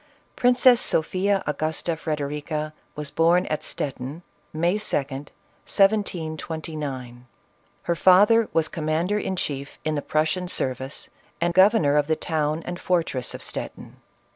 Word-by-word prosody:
Princess 245 0 +5
Sophia 190 +4 +1
Agusta 155 +2 -1
Frederica 150 0 -3 0.2
was 150 -1 -5
born 170 +3 +3
at 155 - -3
Stet 140 - -3
tin, 140 +7 -7 0.3
May 170 +6 +1
2d. 140 -8 -2 0.4
1729. 155 - -1 0.6
Her 170 - 0
father 205 +6 +5
was 160 -1 +2
commander 165 +6 -1
in 190 - -2
chief 140 -5 -4
in 155 - 0
the 145 - -1
Prussian 160 +5 0
service, 130 -3 -3 0.3
and 170 0 +1
governor 185 -6 +5
of 145 -1 +2
the 160 - +2
town 155 0 -1
and 175 0 -5
fortress 165 -8 0
of - - -8
Stettin. - - -5
160 Hz, 130 wpm, -24 LUFS, 150-180 Hz, 0.6 s, Princess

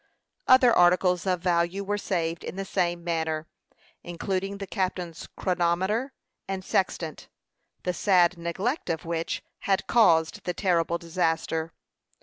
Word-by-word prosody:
Other 255 -2 +7
articles 180 +1 +3
of 180 -2 +1
value 175 +2 +1
were 205 +1 -2
saved 170 -4 -2
in - - -6
the 195 0 -4
same 175 -3 -1
manner, 160 -2 -1 0.6
including 190 +3 -3
the 200 - -5
captain's 180 -3 -3
chronometer 185 +8 0 0.4
and 190 -1 -4
sextant, 165 -4 -1 0.6
the 180 - -1
sad 180 -1 +3
neglect 185 - -3
of 160 -1 -2
which 165 0 -3 0.2
had 195 -1 0
caused 165 -9 +3
the 180 - -3
terrible 170 -3 +1
disaster. 165 -1 -1
180 Hz, 130 wpm, -26 LUFS, 170-195 Hz, 0.6 s, Other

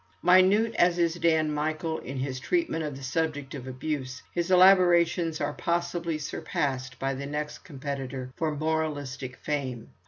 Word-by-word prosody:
Minute 190 +5 +5
as 175 0 +4
is 170 -1 +2
Dan 160 -3 +2
Michael 155 +2 -2
in 135 +1 -7
his 130 0 -3
treatment 335 - 0
of 145 -3 -4
the 135 - -10
subject 145 0 -2
of 130 -3 -7
abuse, 130 0 -4
his 170 0 -1
elaborations 175 -3 +5
are 145 0 -1
possibly 170 -1 -1
surpassed 135 -3 -3
by 135 0 -1
the 140 +1 -5
next 150 +1 -4
competitor 135 -3 -5
for 155 -2 -1
moralistic 145 -4 -2
fame. 130 -6 -4
150 Hz, 150 wpm, -27 LUFS, 135-170 Hz, -, Minute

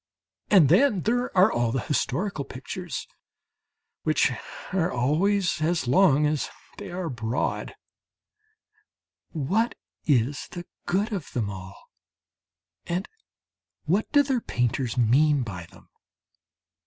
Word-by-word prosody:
And 185 -8 +7
then 195 - +4
there 245 +5 +1
are 185 +4 +6
all 120 -1 +1
the 130 - -1
historical 150 - -1
pictures 150 +7 -6 1.0
which - - +2 0.4
are 180 -3 +1
always 175 +9 +1
as 160 -3 0
long 150 +1 +5
as 150 -1 0 0.3
they - - -7
are 180 0 -4
broad 120 -3 -2 1.5
what 190 - 0 0.3
is 140 0 +1
the 175 -1 -6 0.2
good 205 +5 0
of 185 -8 -4
them 110 -5 -1
all? 95 0 -11 1.0
And 180 +3 -2 0.8
what 190 +8 +1
do 285 -1 +6
their 265 -3 0
painters 125 - -1
mean 135 +4 +4
by 90 -7 -7
them? - - -18
155 Hz, 115 wpm, -26 LUFS, 125-190 Hz, 1.5 s, And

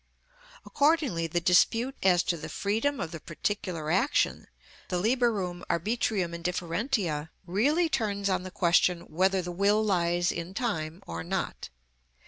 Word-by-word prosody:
Accordingly 285 - +1
the 175 +2 0
dispute 225 +9 +3
as 180 -2 +4
to 175 - 0
the 160 - -7
freedom 225 +8 -1
of 160 - -3
the 165 - -6
particular 165 -1 -3
action, 235 +11 +1 0.4
the 180 - 0
liberum 210 -5 0
arbitrium 190 -1 0
indifferentiæ, 170 - -2 0.2
really 280 - +2
turns 210 -8 -1
on 185 -1 +1
the 185 - -7
question 175 -1 +2
whether 185 +3 +1
the 175 - -5
will 200 +4 +2
lies 175 -3 +1
in 170 +3 -6
time 170 -8 -3
or 85 0 -5
not. 85 - -3
185 Hz, 135 wpm, -28 LUFS, 170-220 Hz, 0.4 s, as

